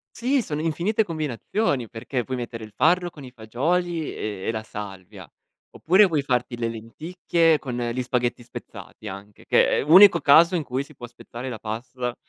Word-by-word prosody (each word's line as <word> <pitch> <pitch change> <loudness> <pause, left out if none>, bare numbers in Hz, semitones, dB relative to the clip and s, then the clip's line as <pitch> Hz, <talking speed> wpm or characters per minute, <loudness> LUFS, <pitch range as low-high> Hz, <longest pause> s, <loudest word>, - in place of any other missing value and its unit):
Sì, 255 +1 +1
sono 150 -3 -4
infinite 175 +7 0
combinazioni 155 - -2
perché 120 +2 -4
puoi 130 +1 -4
mettere 115 -2 -6
il 110 - -10
farro 175 +2 +2
con 145 -4 -13
i 125 - -10
fagioli 160 +9 -2
e 100 -3 -5
e - - 0
la 110 -1 -4
salvia, 100 -3 -9 0.4
oppure 190 +5 +4
vuoi 160 -6 0
farti 125 -2 -1
le 115 -1 -2
lenticchie 160 +8 0
con 125 -5 -6
gli 120 +1 -2
spaghetti 120 -1 -1
spezzati, 125 - -11
anche, 100 +1 -10
che - - +3
è - - +1
l'unico 170 +2 +7
caso 165 +5 +6
in 165 - 0
cui 135 -1 -3
si 150 - -17
può 120 -2 -10
spezzare 120 +2 -9
la 115 - -5
pasta 120 +3 -5
130 Hz, 180 wpm, -24 LUFS, 115-165 Hz, 0.4 s, l'unico